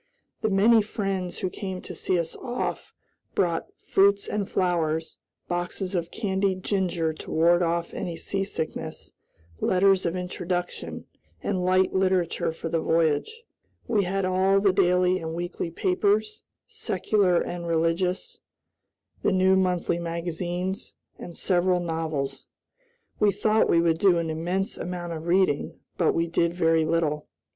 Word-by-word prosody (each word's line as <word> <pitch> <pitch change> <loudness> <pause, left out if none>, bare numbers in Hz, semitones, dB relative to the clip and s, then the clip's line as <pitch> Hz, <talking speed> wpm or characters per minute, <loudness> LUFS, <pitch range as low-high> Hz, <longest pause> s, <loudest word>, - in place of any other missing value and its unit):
The 220 - +1
many 215 +3 +5
friends 195 -4 -3
who 185 - -2
came 190 -3 -5
to - - -8
see 185 - 0
us 165 -1 -2
off 245 -1 -4 0.4
brought 170 -3 +1 0.2
fruits 200 +1 +3
and 205 -2 -2
flowers, 160 -3 0 0.3
boxes 175 +2 -3
of 170 -2 -1
candied 190 -2 -1
ginger 175 -5 0
to - - -10
ward 170 +2 +4
off 170 0 -1 0.2
seasickness, 160 -5 -4 0.5
letters 190 0 +3
of 170 - -2
introduction, 180 0 -4 0.4
and 185 -3 -1
light 185 +1 +3
literature 185 -4 +1
for 165 - -6
the 165 0 0
voyage. 165 - +1 0.4
We 210 -5 +2
had 195 +1 -1
all 190 +1 +3
the 195 -1 +3
daily 180 0 +3
and 160 -1 -5
weekly 175 0 -3
papers, 205 +5 0 0.3
secular 190 -5 +1
and 175 -1 -4
religious, 170 +3 0 0.8
the - - +2
new 190 0 +4
monthly 180 -2 +1
magazines, 175 +2 -3 0.2
and 170 - -8
several 180 -1 +2
novels. 160 -5 -3 0.7
We 210 -1 +4
thought 215 +2 +2
we 170 - +4
would 165 -1 +2
do 185 -2 +5
an 165 -1 -1
immense 180 +6 -2
amount 175 -1 -4
of 160 +1 -6
reading, 180 -5 +2 0.2
but 170 - +3
we 165 - +2
did 170 0 0
very 165 -2 +3
little. 155 -2 0
180 Hz, 135 wpm, -26 LUFS, 165-190 Hz, 0.8 s, many